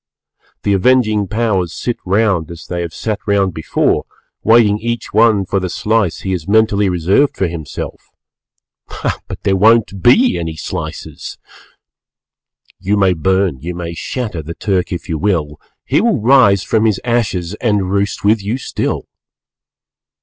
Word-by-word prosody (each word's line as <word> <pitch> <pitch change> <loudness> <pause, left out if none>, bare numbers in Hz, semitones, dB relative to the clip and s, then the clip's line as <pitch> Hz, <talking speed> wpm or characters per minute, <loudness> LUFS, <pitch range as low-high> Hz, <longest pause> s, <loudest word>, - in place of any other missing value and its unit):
The 100 - +2
avenging 110 -1 +2
Powers 100 -4 0
sit 120 - -3
round 95 -5 +1
as 85 -1 -10
they 85 -1 -4
have 85 -1 -4
sat 105 +5 -3
round 100 -3 +2
before, 80 - 0 0.4
waiting 110 -2 +4
each 120 +1 -4
one 110 -2 +4
for 95 +1 0
the 90 -1 -3
slice 105 -1 0
he 95 - -3
has 90 -4 -3
mentally 105 -1 +3
reserved 95 - +1
for 95 - +1
himself. 80 -4 -7 1.2
But - - -8
there 95 - +2
won't 105 -1 +3
be 235 - +4
any 80 -2 -4
slices! 75 - -6 1.4
You 105 +2 0
may 95 -2 +3
burn, 95 -2 0
you 85 +5 -6
may 85 -1 -5
shatter 105 -1 -4
The 85 +2 -8
Turk 95 -2 -1
if 90 -3 -5
you 80 -2 -3
will, 80 -7 -1 0.2
He - - +2
will 230 - +2
rise 110 -5 +4
from 110 +1 +1
his 110 -3 +1
ashes 105 -7 -1
_And 105 -5 +1
roost 100 +1 -1
with 105 +1 +3
you 105 +6 -2
still. 130 - -3
100 Hz, 150 wpm, -16 LUFS, 90-110 Hz, 1.4 s, waiting